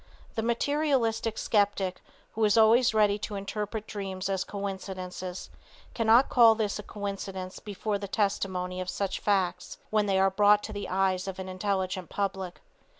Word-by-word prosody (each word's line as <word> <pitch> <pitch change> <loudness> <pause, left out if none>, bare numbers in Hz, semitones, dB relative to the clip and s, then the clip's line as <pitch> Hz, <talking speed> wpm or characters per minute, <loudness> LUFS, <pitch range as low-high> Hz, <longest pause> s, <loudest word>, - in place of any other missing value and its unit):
The 225 - -1
materialistic 235 -2 0
skeptic 200 -3 +1 0.3
who 225 - -2
is 210 0 +4
always 230 +3 +6
ready 210 -2 +3
to 205 - -5
interpret 210 +2 -4
dreams 195 -2 -4
as 190 -1 0
coincidences 190 -2 -6 0.4
cannot 230 +3 +5
call 230 -3 +6
this 210 -2 -1
a - - -3
coincidence 195 -2 -6
before 205 0 -3
the 200 - -5
testimony 185 -3 -1
of 185 - -4
such 200 0 -2
facts 185 -3 0
when 215 -1 +2
they 195 -1 +2
are 195 0 +4
brought 205 +1 +4
to 215 - -6
the 205 -1 -5
eyes 190 0 +1
of 190 -1 -5
an 190 0 -6
intelligent 185 -2 -2
public. 190 -2 -3
200 Hz, 155 wpm, -28 LUFS, 190-215 Hz, 0.4 s, always